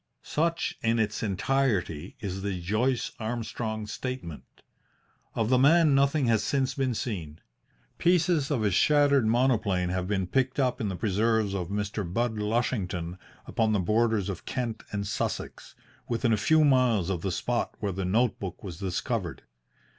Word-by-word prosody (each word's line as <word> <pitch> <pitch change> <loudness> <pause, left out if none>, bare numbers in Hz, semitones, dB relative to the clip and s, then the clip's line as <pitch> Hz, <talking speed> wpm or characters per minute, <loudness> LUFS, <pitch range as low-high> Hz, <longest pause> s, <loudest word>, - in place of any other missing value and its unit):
Such 165 +2 -1
in 115 0 +2
its 105 -2 0
entirety 100 - 0
is 95 -2 -4
the 95 -2 -2
Joyce 110 +8 0
Armstrong 110 -1 -3
Statement. 125 - -7 0.7
Of 110 -1 0
the 130 - +5
man 155 +2 +5
nothing 140 +1 +3
has 115 -3 +2
since 135 -2 0
been 130 -3 -1
seen. 85 - -4 0.6
Pieces 170 -4 +3
of 130 -7 0
his 100 -3 +2
shattered 140 -1 +4
monoplane 110 -7 +2
have 90 0 -2
been 95 -2 0
picked 130 +8 0
up 130 -1 +1
in 105 - -1
the 95 - -3
preserves 110 +1 +1
of 90 -3 -2
Mr. 105 +2 -2
Budd 110 +5 -1
Lushington 100 -6 -1 0.3
upon 110 -1 +1
the 105 - +2
borders 110 +1 +1
of 95 -4 -5
Kent 120 -4 -3
and 100 -1 -2
Sussex, 100 - -4 0.3
within 115 0 +1
a - - +5
few 155 +4 +4
miles 125 - +3
of 90 -3 -2
the 95 - -2
spot 120 +6 -2
where 100 -2 -1
the 95 +1 -3
note 110 +6 +1
book 95 -2 -6
was 90 -5 -7
discovered. 95 -3 -3
110 Hz, 160 wpm, -28 LUFS, 95-130 Hz, 0.7 s, the